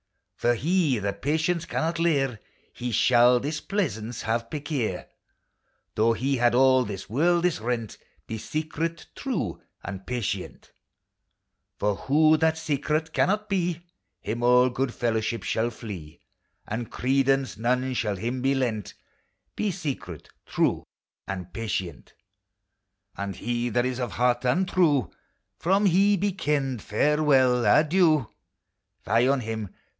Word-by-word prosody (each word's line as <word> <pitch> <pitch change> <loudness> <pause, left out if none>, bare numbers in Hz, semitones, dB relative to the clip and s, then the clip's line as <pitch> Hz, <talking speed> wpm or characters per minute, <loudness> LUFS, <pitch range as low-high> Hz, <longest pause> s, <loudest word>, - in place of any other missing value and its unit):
For 120 0 +1
he 155 0 +1
that 100 -1 -3
patience 160 +4 0
can - - -2
not 165 +1 -1
leir, 135 -8 +1 0.3
He 125 0 -4
shall 120 +1 +5
displeasance 140 - -3
have 115 +1 -1
perquier, 140 - -3 0.9
Though 115 +2 +3
he 135 +4 0
had 120 0 +3
all 130 0 +5
this 100 -4 -6
worldis 170 - +1
rent: 115 -2 -3 0.3
Be 110 - -5
secret, 160 +4 -3
true 270 -4 -3 0.2
and 95 -1 -7
patient! 125 -5 -4 1.1
For 105 0 0
who 155 +3 +4
that 160 0 +2
secret 155 +1 -1
cannot 210 +2 +1
be, 175 -3 -1 0.3
Him 115 +3 -4
all 125 +1 +5
good 130 0 -2
fellowship 115 -2 -1
shall 115 +2 0
flee, 100 -10 -9 0.5
And 115 +2 -4
credence 135 +1 +1
none 125 +3 0
shall 105 -4 -1
him 120 +6 -3
be 135 +1 +2
lent: 115 -6 -2 0.6
Be 215 - 0
secret, 160 -8 -5 0.2
true - - +1 0.4
and 90 -2 -6
patient! 100 -6 -4 1.0
And 100 -1 -4
he 120 +4 -2
that 120 +2 +1
is 130 0 -2
of 120 -6 -3
heart 125 +3 +1
untrue, 170 -2 +2 0.5
From 195 +4 +2
he 200 +2 +4
be 200 +2 0
ken'd 140 - -1
farewell! 135 -1 +3
adieu! 155 - +4 0.7
Fie 115 +4 +3
on 135 -1 +2
him 110 -3 -4
130 Hz, 130 wpm, -26 LUFS, 115-155 Hz, 1.1 s, shall